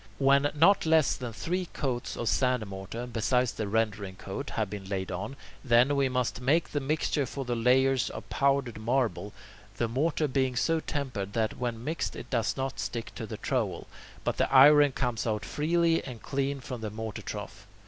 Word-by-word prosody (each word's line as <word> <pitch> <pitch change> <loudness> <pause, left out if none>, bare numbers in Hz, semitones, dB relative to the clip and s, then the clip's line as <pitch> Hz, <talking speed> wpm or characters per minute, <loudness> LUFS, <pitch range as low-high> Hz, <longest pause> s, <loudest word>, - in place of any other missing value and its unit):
When 140 +1 +4
not 165 +3 +5
less 160 -3 +4
than 125 -2 -5
three 180 - -2
coats 125 -4 -3
of 120 - -3
sand 125 -3 +2
mortar, 100 +4 -6
besides 125 +1 +1
the 110 - -4
rendering 105 -3 -1
coat, 100 +10 -6
have 110 -2 -1
been 100 0 -7
laid 95 -2 -3
on, 105 +9 -4 0.3
then, 125 +2 +4
we 140 -1 +2
must 125 -3 -1
make 150 +6 +2
the 145 - 0
mixture 145 0 0
for 135 +2 -5
the 120 -1 -1
layers 130 +2 +3
of - - -8
powdered 135 -5 +1
marble, 115 -2 0 0.5
the 115 - +1
mortar 150 +6 0
being 130 -2 0
so 165 +6 +2
tempered 125 -11 -4
that 110 -1 -1
when 120 -2 -3
mixed 160 +5 -2
it 120 - -9
does 115 -1 0
not 135 0 -3
stick 115 -1 -4
to 110 - -6
the - - -6
trowel, - - -2 0.4
but - - -1
the - - +1
iron 145 +2 +8
comes 120 -3 -2
out 105 -1 -1
freely 165 +2 +1
and 125 -4 -9
clean 140 0 -2
from 125 -2 -6
the 110 - -3
mortar 110 0 -6
trough. - - -7
125 Hz, 190 wpm, -29 LUFS, 110-140 Hz, 0.5 s, iron